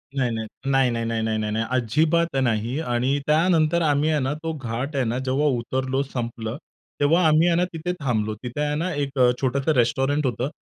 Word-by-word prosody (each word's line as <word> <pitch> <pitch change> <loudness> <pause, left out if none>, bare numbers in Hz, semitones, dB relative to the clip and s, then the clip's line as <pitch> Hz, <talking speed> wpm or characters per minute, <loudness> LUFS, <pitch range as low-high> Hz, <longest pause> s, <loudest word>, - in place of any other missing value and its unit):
नाही 130 -3 +1
नाही. 110 -1 -3 0.2
नाही, 135 -1 +3
नाही, 115 -1 -2
नाही, 115 0 -1
नाही, 110 -1 0
नाही, 105 0 -2
नाही, 110 +1 0
अजिबात 155 +7 +1
नाही. 120 +3 0
आणि 130 -1 0
त्यानंतर 160 +1 +3
आम्ही 150 -1 +2
आहे 155 -1 +2
ना, 135 +1 -1
तो 160 +2 -4
घाट 130 +1 -4
आहे 135 - +1
ना, 115 +2 -1
जेव्हा 135 +3 +1
उतरलो, 130 +3 -1
संपलं. 120 -3 -5 0.4
तेव्हा 160 +5 +3
आम्ही 155 +2 +4
आहे 170 - +3
ना, 175 - +3
तिथे 165 +2 -3
थांबलो. 110 -6 -1
तिथे 125 +4 -4
आहे 150 0 -1
ना, 170 +4 -1
एक 140 -2 -3
अ, 125 -1 +6
छोटंसं 135 +3 +1
रेस्टॉरंट 135 +4 +1
होतं. 125 +1 -1
135 Hz, 205 wpm, -23 LUFS, 120-155 Hz, 0.4 s, अ